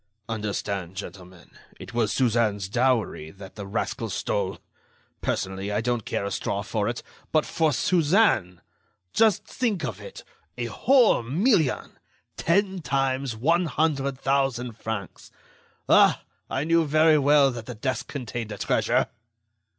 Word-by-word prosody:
"Understand, 100 -4 -3
gentlemen, 90 -2 -10 0.3
it - - -10
was 115 -3 +1
Suzanne's 110 -6 +1
dowry 115 -8 0
that 95 +3 -12
the 100 -2 -8
rascal 100 - -3
stole! - - -2 0.6
Personally, 95 +2 -2
I 105 - 0
don't 120 -1 -1
care - - -2
a 100 - -3
straw 100 +1 -2
for 105 -1 -1
it,... 120 - -5 0.3
but 155 -1 +2
for 160 -2 +1
Suzanne! 155 - +2 0.5
Just 220 -5 +3
think 220 -9 -1
of - - -5
it, - - -10 0.3
a - - -2
whole 255 - +4
million! 160 - +1 0.4
Ten 190 +1 +1
times 135 -3 -1
one 165 +9 +2
hundred 140 -4 0
thousand 135 -4 0
francs! 110 -4 -6 0.6
Ah! - - +5 0.3
I 135 - -1
knew 165 +1 +3
very 155 +1 +5
well 140 -1 +5
that 120 -2 -8
the 125 - -6
desk 130 +4 -3
contained 120 -5 -5
a 105 - -5
treasure!" - - +1
125 Hz, 135 wpm, -25 LUFS, 105-155 Hz, 0.6 s, Ah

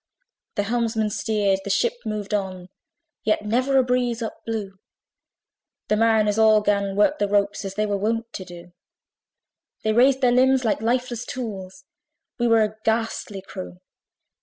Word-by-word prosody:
The 205 - 0
helmsman 220 -1 0
steered, 205 -3 0
the 200 - -6
ship 460 - +2
moved 210 -1 -4
on; 185 -3 -3 0.5
Yet 215 0 0
never 255 +5 +1
a 260 - +5
breeze 245 -2 0
up 220 - -7
blew; 200 -4 -4 1.1
The 210 - +3
mariners 220 -1 +3
all 215 -1 +6
'gan 200 -1 0
work 285 +9 +3
the 205 - +1
ropes, 200 0 0
Where 195 - -3
they 215 - +1
were 205 -1 -1
wont 225 +3 -2
to 190 - -5
do: 175 -1 -12 1.1
They 220 - +1
raised 260 +3 +4
their 250 -2 +4
limbs 260 +1 +3
like 220 - +1
lifeless 240 0 -1
tools 220 -2 -6 0.6
We 240 - +2
were 225 -1 +5
a 215 0 -3
ghastly 220 -3 -2
crew. 90 - -8
215 Hz, 160 wpm, -23 LUFS, 200-235 Hz, 1.1 s, all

